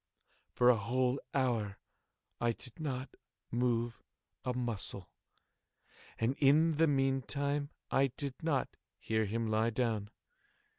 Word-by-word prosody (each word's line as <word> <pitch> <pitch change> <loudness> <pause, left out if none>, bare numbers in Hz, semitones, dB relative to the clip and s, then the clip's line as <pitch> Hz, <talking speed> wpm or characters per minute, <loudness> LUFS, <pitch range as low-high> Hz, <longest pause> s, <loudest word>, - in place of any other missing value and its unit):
For 125 0 +6
a 120 - +2
whole 125 +5 +1
hour 115 -7 0 0.6
I 120 -1 +2
did 125 +5 -9
not 135 -4 -3 0.4
move 120 -1 0 0.4
a 125 - 0
muscle, 115 -6 -3 1.1
and 115 +4 +1
in 150 +3 +5
the 165 +1 +5
meantime 140 +1 +1 0.2
I 135 +1 +4
did 140 -3 -3
not 160 -6 +1 0.3
hear 110 -1 0
him 115 +3 -1
lie 110 +1 +2
down. 110 -3 -1
125 Hz, 115 wpm, -34 LUFS, 115-140 Hz, 1.1 s, For